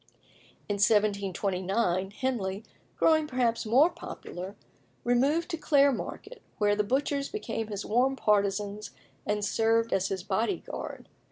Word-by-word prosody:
In 205 - -1
1729 195 -2 +1
Henley, 205 -3 -2 0.3
growing 315 -1 +4
perhaps 240 -4 0
more 275 +10 +5
popular, 185 +3 -8 0.5
removed 280 +8 +2
to 330 - -2
Clare 285 -2 +4
Market, 435 - -6 0.2
where 205 -1 +3
the 210 - +1
butchers 275 +4 0
became 225 - -4
his 205 -1 -5
warm 255 +5 +2
partisans 205 -1 0 0.3
and 210 0 0
served 225 +1 +2
as 195 0 +1
his 190 -2 -3
body 220 - 0
guard. - - -7
215 Hz, 125 wpm, -29 LUFS, 200-265 Hz, 0.5 s, more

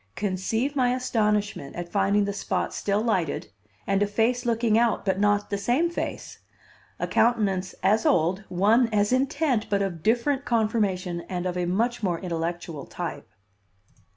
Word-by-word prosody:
Conceive 210 +8 -1
my 250 -2 +2
astonishment 210 - -1
at 175 0 -5
finding 200 +1 +2
the 200 - -2
spot - - -2
still 205 +1 0
lighted 185 -10 -1 0.3
and 195 0 +1
a 205 - +3
face 235 +4 0
looking 230 -1 +2
out, 230 -2 +2
but 190 -1 0
not 205 0 +1
the 200 - -1
same 255 +12 +1
face, - - -5 0.6
a - - -2
countenance 200 -6 +1
as 215 +3 +3
old, 180 +5 +2
one 215 +7 +3
as 210 +2 +2
intent, 265 -2 +1
but 200 -1 +1
of 175 -5 -4
different 245 - +1
conformation 205 -7 0
and 180 -1 -3
of 180 -1 -2
a 180 -1 -1
much 230 +7 0
more 175 -5 0
intellectual 170 -3 -4
type. - - -6
205 Hz, 155 wpm, -25 LUFS, 185-235 Hz, 0.6 s, a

